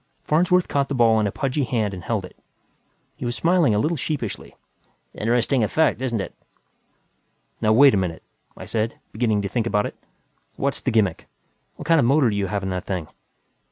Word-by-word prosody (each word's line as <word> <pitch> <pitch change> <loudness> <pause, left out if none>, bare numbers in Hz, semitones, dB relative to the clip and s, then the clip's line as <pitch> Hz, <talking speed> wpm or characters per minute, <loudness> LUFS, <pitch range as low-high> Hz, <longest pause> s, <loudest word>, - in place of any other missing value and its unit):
Farnsworth 180 +3 +2
caught 140 -1 0
the 140 - -2
ball 115 -2 +4
in 105 - +1
a - - -2
pudgy 135 +2 -1
hand 110 -5 -1
and 90 -2 -8
held 110 -5 -2
it. - - -14 0.8
He - - -8
was 120 0 -2
smiling 165 - +3
a - - +2
little 155 +11 +1
sheepishly. 130 -6 -4 0.6
"Interesting 120 +3 +1
effect, 145 +3 +1
isn't 120 -4 -1
it?" 95 - -5 1.3
"Now 110 - +3
wait 135 +5 +7
a - - +3
minute," 90 -4 -3 0.3
I - - -8
said, 115 0 -2
beginning 110 -2 0
to - - -1
think 115 +3 -1
about 105 -2 +1
it. - - -6 0.6
"What's 140 0 -2
the - - -1
gimmick? 105 -8 +1 0.5
What 150 - -9
kind 165 -1 +5
of 135 - +3
motor 135 -3 +4
do - - -2
you 100 -1 -1
have 100 +1 -3
in 95 - -2
that 90 -1 -3
thing?" 90 -6 -3
115 Hz, 195 wpm, -23 LUFS, 105-140 Hz, 1.3 s, wait